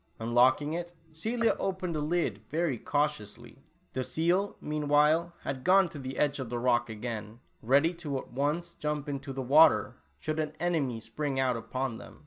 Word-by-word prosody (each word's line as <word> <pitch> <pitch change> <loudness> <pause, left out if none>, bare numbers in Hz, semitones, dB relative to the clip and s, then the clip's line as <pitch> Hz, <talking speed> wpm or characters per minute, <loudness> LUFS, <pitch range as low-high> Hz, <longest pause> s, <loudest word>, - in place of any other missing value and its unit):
Unlocking 125 +6 +3
it, 175 +1 -5 0.2
Celia 225 +9 0
opened 185 -2 -2
the 155 - -2
lid 150 - 0
veyy 155 -6 -1
cautiously. 120 -4 -2 0.3
The 130 - -1
seal, 175 +8 0
meanwhile, 150 +3 +2
had 130 -2 -4
gone 190 0 +5
to 150 - -8
the 130 0 -6
edge 145 -1 +1
of 130 -3 -4
the 120 - -2
rock 120 -1 +2
again, 110 0 -6 0.2
ready 140 +8 +3
to 155 -5 -4
at - - -8
once 150 +6 -1
jump 150 -2 -3
into 140 -1 -4
the 135 0 -4
water, 150 +6 +5 0.2
should 155 0 -3
an 155 -1 -2
enemy 150 -9 0
spring 135 +4 -3
out 130 -2 +2
upon 125 +1 -3
them. - - -13
145 Hz, 170 wpm, -30 LUFS, 125-165 Hz, 0.3 s, gone